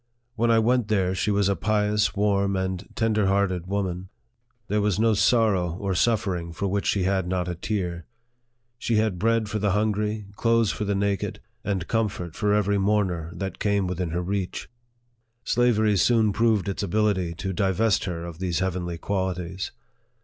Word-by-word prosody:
When 120 0 +1
I 115 - +5
went 120 0 +2
there, 95 -4 +1
she 95 - -1
was 100 -1 +2
a 100 - +2
pious, 105 +2 +1
warm, 100 -1 +1
and 95 0 -2
ten 115 -1 +1
der 105 -2 +2
hearted 95 -3 +1
woman. 95 -2 -2 0.6
There 105 +1 +1
was 105 -1 +1
no 115 0 +4
sorrow 100 -4 +2
or 95 +1 -2
suffer 100 -1 +1
ing 85 -1 -6
for 100 - -2
which 100 +1 -1
she 100 - +1
had 95 -1 0
not 90 -1 -1
a 90 - -2
tear. 90 -2 -3 0.7
She 115 - 0
had 110 -4 +1
bread 115 +1 +2
for 105 +1 -2
the 100 -2 +1
hungry, 105 0 0
clothes 115 -1 +2
for 105 - -3
the 100 0 0
naked, 100 -1 -1 0.2
and 95 -4 -2
comfort 100 -7 -2
for 105 - 0
every 100 -1 +2
mourner 95 -5 0
that 95 -3 -5
"came 100 -2 +1
within 90 -1 -2
her 85 +2 -2
reach. 95 0 -3 0.8
Slavery 110 -4 +2
soon 110 0 +3
proved 110 -3 +2
its 100 - -2
ability 100 -3 0
to 95 +3 -4
divest 100 +2 +1
her 85 -2 -4
of 85 -1 -8
these 90 -3 -1
heavenly 90 -2 -2
qualities. 95 -1 -3
100 Hz, 180 wpm, -25 LUFS, 90-105 Hz, 0.8 s, I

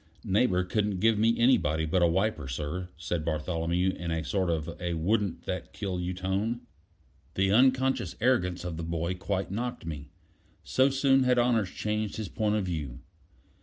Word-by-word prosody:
"Neighbor 95 -2 +2
couldn't 100 0 -1
give 110 +1 +3
me 115 +2 +3
anybody 80 - +3
but 90 +3 +1
a 85 - +6
wiper, 95 -3 0
sir," 75 +7 -4
said 85 -1 -3
Bartholomew, 85 +3 0
in 85 -2 -6
a 80 -1 -1
sort 95 +3 0
of 80 0 -2
a 85 -1 -2
wouldn't 100 +3 0
that - - -4
kill 95 -2 -3
you 90 +1 -2
tone. 100 +6 -1 0.7
The 95 0 +2
unconscious 130 -4 +3
arrogance 100 -8 +1
of 85 -2 -4
the 85 - -4
boy 85 +1 -2
quite 95 +1 -3
knocked 120 -1 -3
me: 75 -3 -6 0.5
so 130 +1 +3
soon 135 0 +3
had 125 -1 +3
honors 120 -5 +2
changed 105 +1 -2
his 110 -4 -4
point 105 -1 0
of 105 -3 0
view. 75 -8 -4
95 Hz, 170 wpm, -28 LUFS, 85-110 Hz, 0.7 s, a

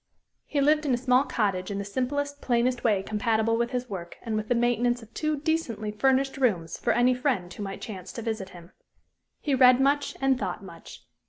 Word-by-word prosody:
He 290 - -1
lived 300 +2 +3
in 260 - +3
a - - -2
small 255 +2 +3
cottage, 195 -7 -1
in 200 - -3
the 200 - -3
simplest, 285 +6 -2
plainest 245 0 +1
way 210 -5 +2
compatible 220 +1 +1
with 235 +1 0
his 250 -1 -3
work 180 -5 -7
and 225 -2 -2
with 215 0 -2
the 245 - +2
maintenance 240 0 +1
of 225 +1 -17
two 305 -1 -1
decently 280 -9 -2
furnished 265 +5 +1
rooms 180 -11 0
for - - 0
any 245 +2 +4
friend 245 -9 -1
who - - -9
might 195 -1 -5
chance 190 -5 -7
to 230 - -6
visit 215 -4 -3
him. 175 -1 -13 0.7
He 290 - -1
read 255 -1 +6
much 285 +1 +1
and 270 -1 +2
thought - - -4
much. - - -12
240 Hz, 205 wpm, -27 LUFS, 210-265 Hz, 0.7 s, read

